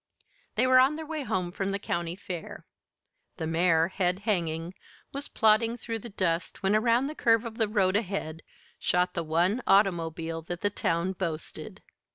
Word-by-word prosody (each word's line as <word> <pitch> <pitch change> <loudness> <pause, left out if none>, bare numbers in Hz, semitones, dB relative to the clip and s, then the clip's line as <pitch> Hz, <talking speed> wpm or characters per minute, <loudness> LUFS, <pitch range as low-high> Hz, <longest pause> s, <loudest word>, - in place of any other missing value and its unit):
They - - +3
were 255 0 +6
on 265 +4 +4
their 315 0 -6
way 310 -1 -4
home 185 -8 -2
from 195 +1 -2
the 195 - -1
county 170 -3 -3
fair. 180 -3 -7 0.7
The 160 - -3
mare, 165 0 +3
head 180 -1 0
hanging, 170 -4 -1 0.4
was 280 +1 -5
plodding 225 +2 +3
through 230 -1 -4
the 235 - -9
dust 185 -2 -2
when 195 +2 +3
around 230 +3 +3
the 295 - -3
curve 230 -5 +3
of 230 0 -7
the 220 - +3
road 195 -3 +2
ahead 185 -6 -2 0.4
shot 180 0 +1
the 170 - -1
one 170 +8 +1
automobile 165 -4 +2
that 175 +2 -6
the 205 - +1
town 170 -1 0
boasted. 165 -4 -5
190 Hz, 175 wpm, -28 LUFS, 170-225 Hz, 0.7 s, were